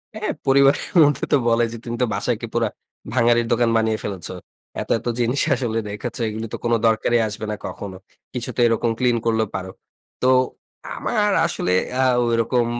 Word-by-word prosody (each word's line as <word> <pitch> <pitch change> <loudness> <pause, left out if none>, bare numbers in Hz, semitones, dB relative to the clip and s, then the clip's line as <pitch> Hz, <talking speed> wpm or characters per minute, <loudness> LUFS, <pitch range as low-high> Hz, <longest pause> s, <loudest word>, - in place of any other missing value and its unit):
হ্যাঁ, 215 0 -2 0.2
পরিবারের 135 +1 +4 0.2
মধ্যে 145 -2 +2
তো - - +7
বলে 115 0 +3
যে, 115 - -6
"তুমি 120 0 -4
তো - - +4
বাসায় 120 - 0
একে 115 - -6
পুরো 115 -1 +1 0.5
ভাঙ্গারির 120 -1 +3
দোকান 120 0 +3
বানিয়ে 110 -1 +1
ফেলেছ। 95 -4 -4 0.5
এত, - - -7
এত - - -9
জিনিস 120 +4 +1
আসলে 115 -3 -1
রেখেছো, 115 +3 -5
এগুলি 110 +1 -5
তো - - -2
কোনো 120 0 +3
দরকারই 115 +2 +2
আসবে 105 +1 -5
না - - -2
কখনো। 95 -2 -6 0.4
কিছু 125 0 -4
তো - - -5
এরকম 115 0 +1
ক্লিন 120 -2 +2
করলেও 110 -2 +1
পারো।" 95 0 -4 0.5
তো 125 - +2 0.7
আমার 210 -3 0
আসলে 90 - -1 0.3
আ - - +4 0.2
ঐরকম 115 +1 +1
115 Hz, 180 wpm, -22 LUFS, 110-125 Hz, 0.7 s, তো